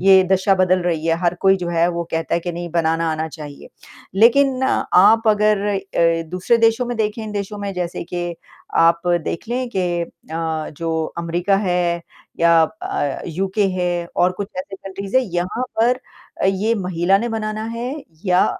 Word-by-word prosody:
ये 190 0 +7
दशा 190 +1 +3
बदल 185 -1 +2
रही 165 -2 -1
है, 165 - +3
हर 175 -1 +1
कोई 195 0 +5
जो 180 -2 -4
है 170 0 +2
वो 170 0 -3
कहता 165 0 -1
है 170 - +1
कि 175 +1 -4
नहीं 175 +1 -5
बनाना 165 -1 +1
आना 160 +1 -3
चाहिए। 150 -2 -10 0.5
लेकिन 260 +5 +4
आप 220 -2 +4
अगर 210 -1 +3
अ, 175 -4 +1
दूसरे 185 +6 +2
देशों 225 +2 +3
में 240 -1 -3
देखें 220 +1 -1
इन 215 - -6
देशों 205 0 -4
में 200 -1 -4
जैसे 175 -1 -3
के, 175 0 -4 0.4
आप 170 +1 +4 0.2
देख 170 - -4
लें 250 +1 -1
कि - - +2 0.2
अ, 160 -1 -4
जो 160 0 -1
अमेरिका 175 +3 +1
है 175 -3 0 0.4
या 170 -1 +6
अ, 160 -5 -3
यूके 190 +4 0
है 175 -1 -1
और 180 +1 +3
कुछ 195 +2 -5
ऐसे 195 +1 -6
कंट्रीज़ 195 +3 -4
है, 260 - +5
यहाँ 180 +7 -1 0.2
पर 250 +3 +3 0.4
अ, - - +2
ये 195 +4 +1
महिला 185 -1 +1
ने 235 +3 -2
बनाना 215 -1 -3
है 245 +4 -3 0.3
या 180 -1 +4
185 Hz, 180 wpm, -20 LUFS, 170-210 Hz, 0.5 s, ये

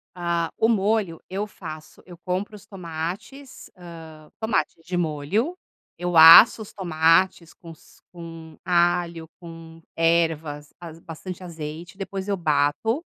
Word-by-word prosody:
Ah, 170 -1 -1
o 225 - +3
molho 210 -5 0
eu 195 +3 -3
faço. 160 -6 -11
Eu 175 -2 -13
compro 185 +4 -4
os 205 - -14
tomates, 190 - -8
hã, 160 -3 -12
tomate 220 0 -1
de 180 +2 -4
molho. 175 - -2 0.4
Eu 175 0 -3
aço 165 +8 +9
os 215 - -10
tomates 170 -1 +1
com 165 - -13
s 160 - -19
com 165 -2 -11
alho, 170 -1 0
com 165 -1 -12
ervas, 160 -3 0
az 165 -2 -10
bastante 175 +3 -9
azeite. 165 +1 -8
Depois 195 0 -6
eu 200 -1 -1
bato, 160 - 0
170 Hz, 130 wpm, -23 LUFS, 160-190 Hz, 0.4 s, aço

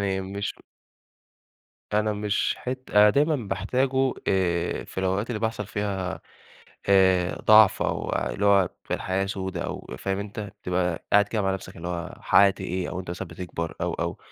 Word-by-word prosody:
يعني 95 -1 0
مش 100 +2 -4 1.4
أنا 105 0 +2
مش 105 0 0
حت 130 +1 -6
أنا 105 0 +7
دايمًا 150 +5 +2
باحتاجه، 130 +7 +1 0.2
آآ، 85 -3 0
في - - -9
الأوقات 95 +5 0
اللي 115 - -2
بيحصل 110 -2 -2
فيها 95 -3 -3 0.7
آآ 95 -2 +4
ضعف، 110 -2 +7
أو - - -2
اللي 100 - -1
هو 100 -3 +5 0.2
في - - -2
الحياة 95 +1 -1
سودا 95 -3 -3
أو - - -6
فاهم 95 0 -2
أنت، 100 +1 -5
بتبقى 90 -4 -2
قاعد 105 0 +6
كده 105 -2 -1
مع 95 0 +1
نفْسك 95 -1 -8
قافل 85 -1 -8
على 90 -1 -2
نفْسك - - -11
اللي - - -10
هو - - -20
حققت 100 -1 +4
إيه، 90 0 -3
أو 95 - -4
أنت 90 - -7
مثلًا 90 +1 -5
بتكبر، 85 -1 -5
أو، - - -1
أو، - - -3
95 Hz, 180 wpm, -25 LUFS, 95-105 Hz, 1.4 s, أنا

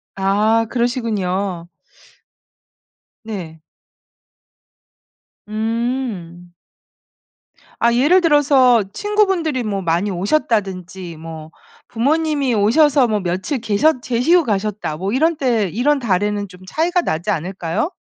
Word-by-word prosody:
아 210 +4 +2
그러시군요. 200 -8 -2 1.6
네. 175 -8 -7 1.9
음. 215 -6 -3 1.3
아 235 0 +4
예를 295 +10 +4
들어서 275 - +4
친구분들이 385 - 0
뭐 200 -3 -2
많이 175 +4 0
오셨다든지 190 - -2
뭐 160 -1 -9 0.4
부모님이 285 +1 0
오셔서 260 +5 +4
며칠 200 - -2
계셨 240 +6 +1
계시고 285 +9 +2
가셨다 205 - -2
뭐 195 +5 -3
이런 320 +4 +2
때 230 -8 +1
이런 275 - +1
달에는 205 -2 -1
좀 180 -1 -15
차이가 345 - 0
나지 170 - -3
않을까요? 180 - -2
220 Hz, 215 characters per minute, -19 LUFS, 190-270 Hz, 1.9 s, 아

